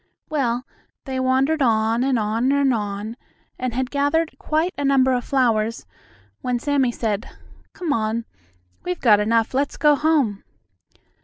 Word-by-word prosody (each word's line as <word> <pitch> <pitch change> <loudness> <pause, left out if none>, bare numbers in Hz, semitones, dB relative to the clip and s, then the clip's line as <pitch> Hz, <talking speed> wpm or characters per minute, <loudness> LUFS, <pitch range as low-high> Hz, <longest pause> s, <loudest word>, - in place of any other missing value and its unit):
Well, 250 -4 0 0.4
they 265 -2 -3
wandered 265 +4 +1
on, 225 -1 +2
and 265 -2 +1
on, 225 +4 0
and 280 -2 +3
on, 210 0 -4 0.4
and 250 -2 -3
had 255 0 -2
gathered 290 +3 0
quite 320 +4 0
a 285 - -3
number 265 -2 +3
of 245 -1 0
flowers, 230 -4 0 0.6
when 250 -1 -1
Sammie 270 -1 +1
said: 220 -2 -3 0.4
"Come 340 -5 -2
on, 225 0 -1 0.6
we've 180 0 -3
got 215 -4 +5
enough; 225 +2 +1
let's 275 +2 -1
go 295 +1 +5
home." 285 -9 +1
255 Hz, 145 wpm, -22 LUFS, 225-280 Hz, 0.6 s, got